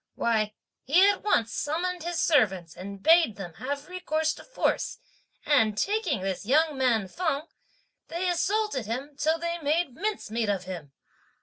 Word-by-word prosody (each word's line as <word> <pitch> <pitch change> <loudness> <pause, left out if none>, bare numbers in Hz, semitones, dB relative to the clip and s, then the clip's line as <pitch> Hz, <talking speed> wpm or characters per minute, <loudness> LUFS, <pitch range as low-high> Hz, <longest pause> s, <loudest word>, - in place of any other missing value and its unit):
Why, 215 -2 0 0.3
he 355 +9 +5
at 405 -2 +2
once 235 - +1
summoned 350 +4 -2
his 345 +1 -3
servants 190 - +2
and 195 +1 -8
bade 325 -9 +5
them 185 -5 -7
have 280 +2 -4
recourse 320 -4 -1
to - - -12
force; - - -1 0.5
and, 225 -8 +3
taking 390 - 0
this 190 0 -2
young 300 +6 +3
man 240 -6 +2
Feng, 310 - -1 0.6
they 345 +3 -2
assailed 415 +5 +1
him 260 +4 -4
till 315 +3 +1
they 340 +1 -3
made 310 -1 0
mincemeat 240 - -2
of 195 -3 0
him. 175 -6 -7
290 Hz, 150 wpm, -27 LUFS, 215-345 Hz, 0.6 s, he